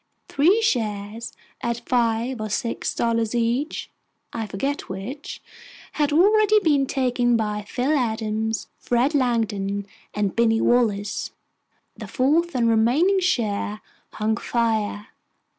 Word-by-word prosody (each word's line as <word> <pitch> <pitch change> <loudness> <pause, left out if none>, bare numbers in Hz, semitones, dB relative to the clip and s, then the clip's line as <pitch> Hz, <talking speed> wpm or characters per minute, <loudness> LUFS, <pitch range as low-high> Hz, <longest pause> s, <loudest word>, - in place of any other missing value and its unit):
Three 365 +11 +3
shares, 220 - -2 0.3
at 235 0 -3
five 235 0 0
or 215 - -3
six 230 +3 -2
dollars 230 -1 0
each, 240 +6 -1 0.4
I 225 -2 -3
forget 275 +9 -3
which, 210 +10 -7 0.5
had 295 -1 0
already 425 +6 +5
been 290 -6 +2
taken 245 -3 +1
by 210 -2 -2
Phil 265 +8 0
Adams, 220 -3 -1
Fred 245 +5 +1
Langdon, 215 -7 0 0.3
and 205 -2 -1
Binny 225 -1 +3
Wallace. 210 -5 +1 0.7
The - - -8
fourth 310 +6 +1
and 235 -2 +2
remaining 250 - +3
share 215 - -1 0.3
hung 220 +1 0
fire. 220 -3 -1
235 Hz, 115 wpm, -23 LUFS, 215-275 Hz, 0.7 s, already